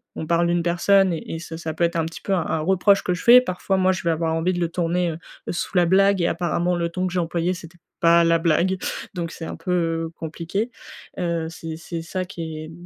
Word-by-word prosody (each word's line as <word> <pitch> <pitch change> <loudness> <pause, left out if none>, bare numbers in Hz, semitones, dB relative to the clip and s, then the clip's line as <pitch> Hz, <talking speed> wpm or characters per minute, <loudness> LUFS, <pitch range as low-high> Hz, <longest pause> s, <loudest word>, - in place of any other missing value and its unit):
on - - -4
parle 170 +1 +2
d'une 170 0 +1
personne 190 +2 +3
et 165 - -5
et - - -5
ça 165 -1 -7
ça 160 -1 -4
peut 165 - -1
être 170 0 +1
un 165 - +1
petit 165 - -8
peu 195 - -1
un 175 -4 +1
un 160 - -1
reproche 190 +4 +3
que 180 - 0
je 180 - -5
fais, 245 +1 +9
parfois 190 -3 -1
moi, 185 0 +3
je 185 - -3
vais 170 - +2
avoir 160 0 0
envie 165 +3 +1
de 175 - -2
le 170 -1 0
tourner, 175 0 0
heu, 155 - -6 0.3
sous 175 - -4
la 175 - +5
blague 195 +2 +4
et 170 - +2
apparemment 175 +1 0
le 170 -1 -1
ton 185 +2 -2
que 180 - -5
j'ai 185 - +1
employé, 170 +1 0
c'était 175 -1 -11 0.2
pas 170 0 +5
la 165 0 +4
blague. 170 +3 +2 0.4
Donc 170 -3 -3
heu, - - -10
c'est 165 - -6
un - - -5
peu 165 -1 -1
compliqué, 170 +8 -4 0.5
heu, 170 -2 -1
c'est 165 -1 -7
c'est 165 0 -6
ça, 185 +3 -4
qui 165 -4 -6
est 155 +1 -8
170 Hz, 255 wpm, -23 LUFS, 165-185 Hz, 0.5 s, fais